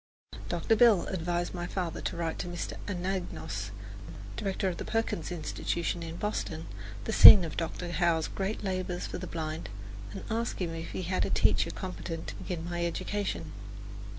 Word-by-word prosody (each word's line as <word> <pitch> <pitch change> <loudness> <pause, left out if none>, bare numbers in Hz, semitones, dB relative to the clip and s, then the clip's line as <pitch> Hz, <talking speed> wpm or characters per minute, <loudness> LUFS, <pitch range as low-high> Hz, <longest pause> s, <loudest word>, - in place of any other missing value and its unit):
Dr. 225 - +2
Bell 220 -5 +6
advised 175 -1 -1
my 175 -1 -3
father 180 -3 -3
to - - -3
write 165 -1 -2
to - - -3
Mr. 175 -1 -4
Anagnos, 180 - -3 0.7
director 195 0 -1
of 180 -2 -2
the - - -4
Perkins 225 -7 -1
Institution 170 +1 -2
in 165 0 -5
Boston, 170 -5 -3 0.4
the - - -2
scene 190 -5 +11
of 160 - -5
Dr. 175 +1 -3
Howe's 170 -1 +2
great 200 +3 -3
labours 185 -2 -2
for - - -5
the 185 - -5
blind, 160 -1 -4 0.4
and - - -7
ask 230 +1 -2
him 170 -3 -2
if 165 0 -6
he 185 - -3
had 185 +2 0
a - - 0
teacher - - +3
competent 175 -3 -5
to - - -7
begin 170 -3 -4
my 175 0 -2
education. 200 +4 -2
175 Hz, 170 wpm, -30 LUFS, 165-190 Hz, 0.7 s, scene